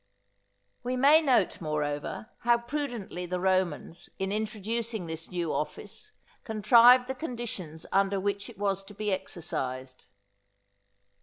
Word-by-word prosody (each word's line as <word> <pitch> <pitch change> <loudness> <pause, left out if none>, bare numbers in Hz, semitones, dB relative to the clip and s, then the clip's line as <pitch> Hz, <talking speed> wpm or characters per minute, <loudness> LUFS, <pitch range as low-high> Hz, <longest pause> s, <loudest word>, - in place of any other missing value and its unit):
We 250 +1 -2
may 290 +5 +6
note, 250 - +2
moreover, 150 +7 -3
how 235 0 +4
prudently 235 -8 -4
the 180 +1 -2
Romans, 185 -2 -1
in 190 0 -2
introducing 220 0 -2
this 160 0 -6
new 175 -3 -2
office, 210 - -5 0.3
contrived 235 +3 +6
the 265 - -3
conditions 230 - -6
under 195 0 +2
which 200 +1 -2
it - - -13
was 195 -1 -1
to 205 - -13
be 210 0 -2
exercised. 130 -8 -4
200 Hz, 125 wpm, -29 LUFS, 175-235 Hz, 0.3 s, may